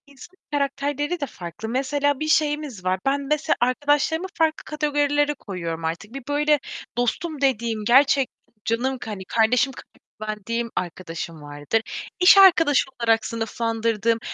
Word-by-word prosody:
İnsanın 285 +6 -15 0.2
karakterleri 290 +3 -1
de 285 - -1
farklı. 180 - -8
Mesela, 275 +3 0
bir 310 - -2
şeyimiz 295 -8 0
var. 185 0 +1
Ben, 275 +1 +1
mesela, 290 +1 0
arkadaşlarımı 290 +7 +1
farklı 320 -1 0
kategorilere 290 -1 +1
koyuyorum 170 - -5
artık. 170 +8 -4
Bir, 275 -1 -7
böyle, 295 +1 +2 0.4
dostum 285 +5 -1
dediğim, 230 -5 0
gerçekten 270 +2 +4 0.3
canım 255 +4 0
k 240 -3 -7
hani, 190 -2 -7
kardeşim 240 +6 +2
kadar - - -15 0.2
güvendiğim 215 +2 -3
arkadaşım 165 -2 -5
vardır. 145 +9 -2 0.4
İş 365 +2 +8
arkadaşı 330 -7 +6
olarak 225 -1 +2
sınıflandırdığım, 230 0 -1
260 Hz, 135 wpm, -23 LUFS, 220-290 Hz, 0.4 s, İş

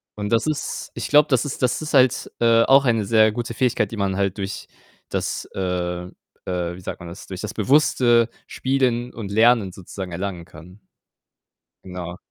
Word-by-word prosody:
Und 105 -1 -4
das 115 +5 +2
ist 155 -2 -3
ich - - -4
glaube, 150 0 +6
das 130 -4 +3
ist 140 - -5
das 125 +4 +1
ist 155 0 -5
halt, 130 -2 +3
äh, 115 -1 +5
auch 135 +1 +5
eine 115 -3 +2
sehr 110 0 +4
gute 120 -1 -4
Fähigkeit, 115 -4 0
die 115 - -6
man 100 -2 0
halt 100 0 -1
durch 95 0 -5 0.4
das - - -3
äh, - - -6
äh, 90 -1 -3 0.3
wie 90 0 -3
sagt - - -6
man 85 - -8
das, 90 +4 -11
durch 95 -1 -7
das 105 - -5
bewusste 120 -1 +3 0.2
Spielen 125 -2 -1
und 105 -4 -6
Lernen 110 -3 +3
sozusagen 95 -1 -8
erlangen 90 -2 -4
kann. 90 +6 -14 1.1
Genau. 90 -1 -7
105 Hz, 180 wpm, -22 LUFS, 95-120 Hz, 1.1 s, glaube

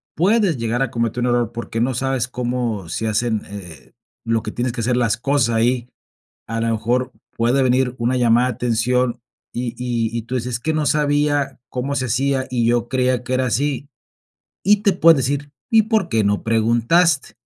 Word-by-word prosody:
puedes 195 - +2
llegar 115 +1 -1
a 135 - +1
cometer 115 +1 -2
un 125 - +1
error 120 -2 +1
porque 115 -1 -5
no 130 +2 +1
sabes 130 -1 -1
cómo 120 -7 -3
se 110 +7 -2
hacen, 110 0 0
eh, 90 -8 -11 0.3
lo 115 0 +1
que 105 - -6
tienes 120 +2 -2
que 120 - -4
hacer 120 +2 +1
las 115 -3 +1
cosas 120 -2 +1
ahí, 120 +1 +1 0.6
a 115 +1 -3
lo 115 - 0
mejor 120 +3 0 0.3
puede 120 +4 +2
venir 130 0 +2
una 120 +2 +1
llamada 120 0 +3
de - - -2
atención, 120 +1 0 0.3
y 120 -1 -3
y 115 -2 -2
y 115 - -4
tú 120 - -8
dices: 125 0 -2
"Es - - -3
que 160 +6 -1
no 155 -1 0
sabía 145 -2 +1
cómo 130 +3 -3
se 130 - -1
hacía, 130 +3 0
y 120 -2 0
yo 120 0 +1
creía 130 -1 +1
que 125 +1 -4
era 130 0 +1
así". 140 +4 -1 0.8
Y 205 +2 +5
te 205 -2 +3
pueden 165 -3 +6
decir: 140 +2 -2 0.2
"¿Y 225 -2 +6
por 215 -4 0
qué 110 -5 +1
no 100 0 +1
preguntaste?", 120 +8 +2
125 Hz, 195 wpm, -20 LUFS, 115-135 Hz, 0.8 s, pueden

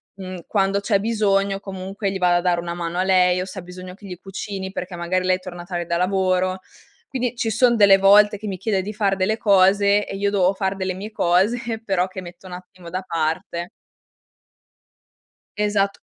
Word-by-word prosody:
mhmm, 185 -3 -8
quando 195 -1 +1
c'è 200 -1 +1
bisogno 200 -3 +1
comunque 195 +1 -5
gli 195 - -3
vado 175 -1 +3
a - - 0
dare 175 -1 +1
una 170 0 -4
mano 170 0 -4
a - - +2
lei, 180 -1 +3
o - - -3
se 190 0 -8
ha - - -7
bisogno 180 +1 -10
che 205 - -15
gli 180 -2 -7
cucini 195 0 -6
perché 180 -1 -6
magari 180 +2 -1
lei 185 0 +3
è - - -7
torna 175 -2 -9
tardi 175 -2 -4
da 170 - 0
lavoro. 185 0 +1 0.5
Quindi 250 -2 -2
ci 225 - -1
son 235 +2 +3
delle 200 -2 +7
volte 205 +2 +5
che 215 - -10
mi 190 -2 -4
chiede 195 0 0
di 210 +3 -6
far 200 -2 +1
delle 195 +4 0
cose, 200 0 +4
e - - -6
io 200 0 +1
devo 190 -1 +2
far 190 0 -2
delle 190 -1 -2
mie 205 +4 -7
cose, 190 +6 +2 0.3
però 185 -2 +1
che 185 0 -7
metto 180 +1 -12
un 180 - -9
attimo 180 -1 -11
da 185 +1 -2
parte. 165 +1 -3 1.9
Esat 205 -1 +1
190 Hz, 205 wpm, -22 LUFS, 180-200 Hz, 1.9 s, delle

